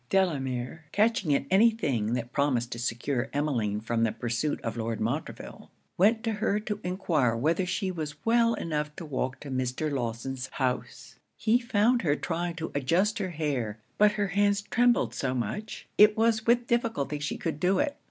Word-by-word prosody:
Delamere, 145 Hz, -5 st, 0 dB
catching 210 Hz, -6 st, +2 dB
at -, -, 0 dB
any 210 Hz, +5 st, +6 dB
thing 130 Hz, -, -1 dB
that 120 Hz, -1 st, -3 dB
promised 125 Hz, -4 st, +1 dB
to 115 Hz, -, -5 dB
secure 120 Hz, +2 st, -2 dB
Emmeline 120 Hz, -9 st, 0 dB
from 115 Hz, +1 st, -1 dB
the 115 Hz, -1 st, +2 dB
pursuit 120 Hz, +6 st, -2 dB
of 115 Hz, -, -3 dB
Lord 115 Hz, -1 st, -3 dB
Montreville, 120 Hz, +8 st, -4 dB, 0.3 s
went 220 Hz, +5 st, +3 dB
to 225 Hz, -, 0 dB
her 210 Hz, -1 st, 0 dB
to 210 Hz, -1 st, -4 dB
enquire 165 Hz, -, +1 dB
whether 165 Hz, +9 st, +1 dB
she 190 Hz, +1 st, -1 dB
was 155 Hz, -4 st, -5 dB
well 230 Hz, 0 st, +4 dB
enough 150 Hz, -2 st, -3 dB
to 170 Hz, -, -7 dB
walk 130 Hz, -3 st, -3 dB
to 140 Hz, -, -7 dB
Mr. 130 Hz, +4 st, -1 dB
Lawson's 125 Hz, 0 st, -3 dB
house. 130 Hz, -2 st, -3 dB, 0.2 s
He 230 Hz, +2 st, +3 dB
found 235 Hz, 0 st, +2 dB
her 145 Hz, -5 st, +2 dB
trying 170 Hz, +2 st, -3 dB
to 160 Hz, -1 st, -5 dB
adjust 180 Hz, -, +1 dB
her 190 Hz, -2 st, -2 dB
hair; 140 Hz, -10 st, -2 dB, 0.2 s
but 210 Hz, 0 st, +6 dB
her 205 Hz, -2 st, -1 dB
hands 200 Hz, +1 st, +2 dB
trembled 240 Hz, +3 st, +2 dB
so 130 Hz, -1 st, -2 dB
much, 210 Hz, -, -4 dB
it 210 Hz, +1 st, +7 dB
was 225 Hz, 0 st, +2 dB
with 240 Hz, +1 st, +4 dB
difficulty 225 Hz, -, -1 dB
she 145 Hz, -, -3 dB
could 160 Hz, -3 st, -3 dB
do 185 Hz, +3 st, +2 dB
it. 290 Hz, -1 st, 0 dB
155 Hz, 180 wpm, -28 LUFS, 130-210 Hz, 0.3 s, it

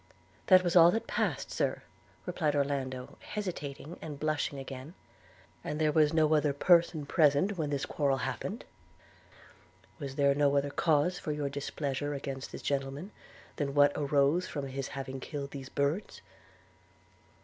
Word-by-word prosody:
'That 185 Hz, -1 st, +7 dB
was 175 Hz, 0 st, 0 dB
all 170 Hz, -1 st, +9 dB
that 225 Hz, +5 st, 0 dB
passed, -, -, -1 dB
Sir,' -, -, -1 dB, 0.4 s
replied 150 Hz, -3 st, 0 dB
Orlando 135 Hz, -3 st, -2 dB
hesitating, 170 Hz, -6 st, -6 dB
and 150 Hz, -3 st, -7 dB
blushing 155 Hz, -2 st, -1 dB
again. 135 Hz, +4 st, -8 dB, 0.7 s
'And 150 Hz, -, -4 dB
was 155 Hz, -1 st, +5 dB
there -, -, -2 dB
no 155 Hz, -1 st, +4 dB
other 150 Hz, -2 st, +3 dB
person 165 Hz, 0 st, +3 dB
present 155 Hz, +6 st, +3 dB
when 155 Hz, -4 st, -2 dB
this 140 Hz, -2 st, -1 dB
quarrel 140 Hz, -3 st, 0 dB
happened? -, -, -4 dB, 1.3 s
Was 135 Hz, -1 st, -6 dB
there 140 Hz, -1 st, +4 dB
no 140 Hz, 0 st, +3 dB
other 140 Hz, 0 st, 0 dB
cause 165 Hz, +4 st, +2 dB
for 155 Hz, -, -3 dB
your 150 Hz, -1 st, -2 dB
displeasure 145 Hz, 0 st, -3 dB
against 135 Hz, -1 st, -5 dB
this -, -, -8 dB
gentleman, 140 Hz, +7 st, -2 dB, 0.5 s
than 140 Hz, -2 st, -2 dB
what 145 Hz, 0 st, +6 dB
arose 145 Hz, +4 st, +2 dB
from 145 Hz, -2 st, -4 dB
his 135 Hz, 0 st, -4 dB
having 135 Hz, -1 st, -6 dB
killed 140 Hz, +1 st, -6 dB
these 135 Hz, -2 st, -7 dB
birds? 145 Hz, +9 st, -2 dB
145 Hz, 150 wpm, -31 LUFS, 140-155 Hz, 1.3 s, all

